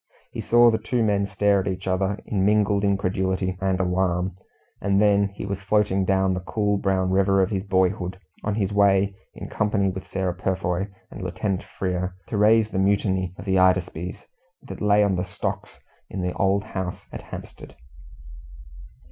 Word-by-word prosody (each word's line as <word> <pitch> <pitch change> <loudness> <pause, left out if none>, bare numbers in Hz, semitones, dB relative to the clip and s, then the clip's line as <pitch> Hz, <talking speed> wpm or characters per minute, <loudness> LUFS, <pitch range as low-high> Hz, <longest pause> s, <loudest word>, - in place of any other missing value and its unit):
He - - -5
saw 120 0 +5
the 110 - 0
two 115 +2 0
men 100 -2 +1
stare 100 0 +2
at 95 - -3
each 95 0 -3
other, 95 +2 0
in 95 -2 -1
mingled 105 0 +2
incredulity 95 -1 0
and 95 -1 0
alarm, 90 0 0 0.5
and 100 0 +2
then 100 -1 +4
he 100 0 -8
was 100 0 -4
floating 100 -1 +1
down 95 0 +2
the 90 - -2
cool 105 +2 -1
brown 95 -1 0
river 95 +1 +3
of 95 +1 +2
his 95 -2 -1
boyhood, 95 -1 0 0.3
on 105 -1 -1
his 105 -2 -1
way 100 -1 +3 0.2
in - - -7
company 105 -2 0
with 95 0 -6
Sarah 95 -2 -2
Purfoy 90 0 -1 0.2
and - - -8
Lieutenant 95 +1 -2 0.2
Frere 90 -1 -2
to 110 - -2
raise 110 +1 +4
the 95 - -1
mutiny 95 -2 +1
of - - -9
the 95 -1 +2
Hydaspes, 90 -1 +1 0.4
that - - -9
lay 105 0 +4
on 100 -2 +1
the 90 - 0
stocks 90 -1 -5 0.3
in 95 - -4
the 90 - -1
old 100 +1 +1
house 95 -4 -5
at - - -7
Hampstead. - - -10
95 Hz, 175 wpm, -24 LUFS, 95-100 Hz, 0.5 s, saw